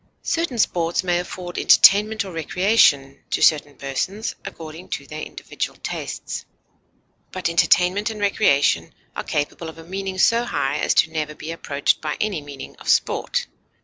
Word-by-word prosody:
Certain 330 -7 -1
sports 175 -6 +1
may 175 -1 +1
afford 180 0 -6
entertainment 210 +1 +5
or 190 - -7
recreation 165 -5 +2
to - - -1
certain 145 -2 +3
persons, 185 +11 -3
according 160 +2 -9
to 140 - -4
their 155 +2 -7
individual - - -5
tastes; - - -5 0.9
but 185 - -2
entertainment 180 +5 +3
and 220 -1 -6
recreation 140 - +2 0.2
are - - -3
capable 150 +3 -3
of 160 - -12
a 165 - -10
meaning 190 +2 -5
so 230 +5 +4
high 145 - -1
as - - +1
never 155 -1 -3
to - - -23
be 160 - -6
approached 145 -4 0
by 150 -1 -3
any 205 -7 -1
meaning 145 -1 -10
of - - -8
sport. - - +1
170 Hz, 155 wpm, -22 LUFS, 150-200 Hz, 0.9 s, entertainment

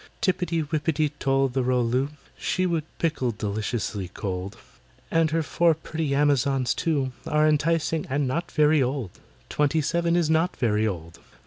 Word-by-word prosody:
"TIPPY 175 -3 0
WIPPITY 155 0 0
TOL 135 0 +2
THE 130 +1 -1
ROL 125 -1 +1
LOO, 130 +4 0 0.3
She 185 - -1
would 165 -4 0
pickle 155 -7 0
deliciously 105 -2 -3
cold— 95 +1 -5 0.5
And 165 -1 +3
her 160 +1 0
four 170 +1 +2
pretty 155 -2 -3
Amazons, 140 -3 +2
too, 140 -5 0 0.2
Are 150 0 +3
enticing, 155 +1 +1
and 140 +1 0
not 165 +7 -2
very 150 0 +4
old— 130 -6 -2 0.3
Twenty 150 +2 +1
seven 170 +3 +1
is 175 -3 +2
not 160 +3 +1
very 110 -2 +1
old. 85 -4 -6
145 Hz, 150 wpm, -25 LUFS, 125-160 Hz, 0.5 s, very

